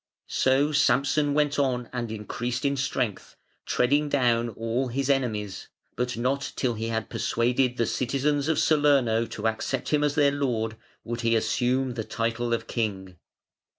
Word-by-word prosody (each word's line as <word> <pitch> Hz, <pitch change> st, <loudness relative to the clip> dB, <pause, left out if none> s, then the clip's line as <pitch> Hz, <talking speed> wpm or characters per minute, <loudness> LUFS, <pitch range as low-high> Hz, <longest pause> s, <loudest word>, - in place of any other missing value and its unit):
So 135 Hz, +3 st, +2 dB
Samson 145 Hz, +1 st, +2 dB
went 145 Hz, -1 st, +1 dB
on 125 Hz, -3 st, 0 dB
and 120 Hz, -3 st, -3 dB
increased 120 Hz, +5 st, -4 dB
in 140 Hz, 0 st, +2 dB
strength, 125 Hz, -6 st, -2 dB, 0.3 s
treading 145 Hz, +4 st, +2 dB
down 120 Hz, -4 st, +2 dB
all 115 Hz, +3 st, -2 dB
his 135 Hz, +3 st, 0 dB
enemies; 110 Hz, -7 st, -2 dB, 0.3 s
but 125 Hz, -1 st, -2 dB
not 135 Hz, +4 st, -1 dB
till 125 Hz, -3 st, 0 dB
he 110 Hz, 0 st, -4 dB
had 115 Hz, 0 st, -2 dB
persuaded 125 Hz, +2 st, 0 dB
the 115 Hz, -, +2 dB
citizens 140 Hz, +5 st, 0 dB
of 160 Hz, -2 st, +1 dB
Salerno 140 Hz, -8 st, +3 dB
to 110 Hz, +1 st, -3 dB
accept 110 Hz, +4 st, -2 dB
him 150 Hz, -1 st, +2 dB
as 145 Hz, -1 st, +1 dB
their 145 Hz, -2 st, +4 dB
lord 120 Hz, -6 st, -1 dB, 0.3 s
would 120 Hz, 0 st, -4 dB
he 115 Hz, -1 st, +2 dB
assume 125 Hz, +3 st, +1 dB
the 115 Hz, -2 st, -3 dB
title 115 Hz, +2 st, -2 dB
of 115 Hz, -1 st, 0 dB
king. 95 Hz, -7 st, -3 dB
125 Hz, 155 wpm, -26 LUFS, 115-140 Hz, 0.3 s, their